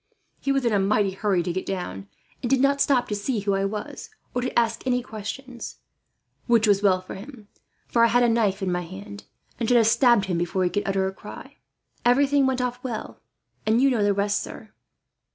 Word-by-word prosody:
He 275 - -1
was 275 -2 +1
in 235 - +2
a 205 - +3
mighty 200 0 +2
hurry 190 -2 0
to 175 - -2
get 185 - -2
down, 175 - -5 0.3
and 240 - -2
did 270 0 +3
not 280 +1 +3
stop 255 -4 +3
to 210 - -1
see 210 +2 -2
who 200 0 0
I 195 0 +1
was, 210 +1 -5 0.2
or 250 - -1
to 255 - -3
ask 230 -1 +1
any 250 -1 +1
questions; 240 +3 -7 0.7
which 230 -2 +4
was 200 -1 +4
well 190 -3 +3
for 185 - -9
him, 215 +1 -11 0.4
for 235 - +3
I - - +7
had 245 +1 +3
my - - +5
knife 210 -4 +1
in 185 - 0
my 175 0 0
hand, 200 +4 -9 0.3
and 230 - -1
should 245 - +5
have 230 - +5
stabbed 235 -2 +4
him 180 -3 -1
before 175 +2 -1
he 180 - +1
could 205 +4 -2
utter 195 -1 +1
a 190 - -2
cry. - - -11 0.5
Everything 275 +2 +4
went 260 -1 0
off 250 0 -3
well, 240 -4 -5 0.4
and 220 +2 +2
you 270 +1 +4
know 235 -4 +1
the 205 - +3
rest, 200 +1 0
sir." 215 - -9
215 Hz, 225 wpm, -24 LUFS, 195-245 Hz, 0.7 s, I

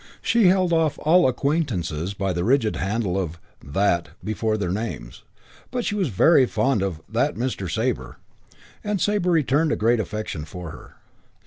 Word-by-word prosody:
She 225 -3 +4
held 185 -1 +3
off 160 -3 +2
all 175 +2 +5
acquaintances 105 - -1
by 95 -1 -1
the 85 0 -2
rigid 115 0 +2
handle 95 -1 -1
of 85 -2 -6 0.2
"that" 85 +2 0
before 110 0 -1
their 90 -4 -2
names, 95 - -5 0.5
but 245 -1 -3
she - - -1
was 200 -4 0
very 130 - +4
fond 115 0 +1
of 90 -5 -3
"that - - 0
Mr. 115 -5 -3
Sabre", 65 -5 -2 0.7
and 210 -2 -1
Sabre 205 -1 +1
returned 155 -1 +2
a - - +2
great 115 +2 +2
affection 105 -7 -4
for 85 +1 -8
her. - - -13
110 Hz, 160 wpm, -23 LUFS, -, 0.7 s, all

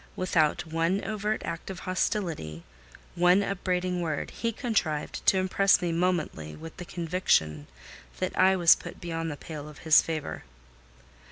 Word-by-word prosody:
Without 165 -5 +1
one 165 +4 0
overt 215 0 -2
act 170 +2 -5
of 185 -1 -6
hostility, 170 - -2 0.5
one 180 +3 +4
upbraiding 180 -2 -1
word, 155 -4 -3
he 230 - -2
contrived 200 - -2
to 190 - +6
impress 190 +1 +3
me 175 -2 -1
momently 165 - -1
with 160 +1 -10
the 180 - -7
conviction 160 - 0 0.5
that 185 - -2
I 190 +1 +5
was 175 -3 +7
put - - -8
beyond 165 -1 -3
the 145 - -5
pale 150 -1 -8
of 150 - -13
his 160 -2 +7
favour. 155 -3 -4
175 Hz, 150 wpm, -28 LUFS, 160-185 Hz, 0.5 s, was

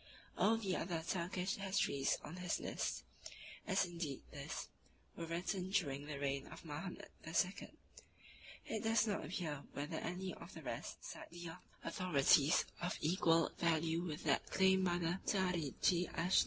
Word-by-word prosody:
All 225 +2 +4
the 195 -5 0
other 165 -2 -2
Turkish 180 +1 -1
histories 190 -8 +1
on 175 - -7
his 180 -2 0
list, - - -2 0.6
as 190 0 +3
indeed 170 -6 -4
this, - - -5 0.5
were 165 - -4
written 180 +2 -1
during 145 -8 0
the 150 -2 -4
reign 140 -1 -1
of - - -10
Mahomet 160 +5 -5
II. 180 +4 0 1.0
It 220 -2 -2
does 225 0 +4
not 210 -2 0
appear 150 -4 -3
whether 145 +1 -3
any 185 +1 -3
of - - -10
the - - -8
rest - - -5
cite - - -7
earlier 170 0 -7 0.2
authorities 150 -3 +4 0.2
of 175 - -1
equal 165 0 +3
value 165 0 +2
with 160 -4 -4
that 145 -3 +2
claimed 190 0 +4
by 175 -1 +2
the 175 +1 0
"Tarichi 180 -2 +2
Aaschik - - -12
Paschasade." 175 +3 +4
175 Hz, 155 wpm, -39 LUFS, 155-185 Hz, 1.0 s, All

